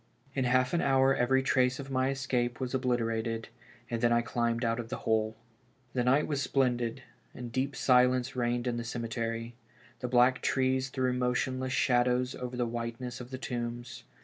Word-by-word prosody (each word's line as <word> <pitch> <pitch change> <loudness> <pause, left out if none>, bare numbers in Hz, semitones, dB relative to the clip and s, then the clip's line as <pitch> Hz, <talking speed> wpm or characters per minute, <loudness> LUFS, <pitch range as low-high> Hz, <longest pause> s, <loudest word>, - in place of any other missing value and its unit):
In 130 -1 0
half 130 +1 +2
an 170 - +2
hour 135 0 +4
every 130 +2 +2
trace 130 -1 +2
of 135 -1 -7
my 130 0 +1
escape 125 -3 -1
was 130 -1 -3
obliterated, 115 -3 -1 0.4
and 115 -1 -3
then 120 - +3
I 120 0 +3
climbed 120 0 0
out 115 +1 0
of 115 -1 -5
the 130 - -3
hole. 110 0 +1 0.6
The 125 - +1
night 135 +4 +3
was 145 -3 -1
splendid, 125 -2 0 0.3
and 120 -1 -7
deep 135 +3 -1
silence 125 0 +3
reigned 120 0 0
in 120 -1 -1
the 120 - -3
cemetery; 115 0 -3 0.5
the 125 - -3
black 125 +1 +4
trees 130 0 +1
threw 130 -1 0
motionless 130 +1 -1
shadows 125 0 +2
over 125 0 -6
the 120 - +1
whiteness 120 +1 -4
of 125 - -9
the 130 - -5
tombs. 120 -1 -5
125 Hz, 175 wpm, -30 LUFS, 120-130 Hz, 0.6 s, hour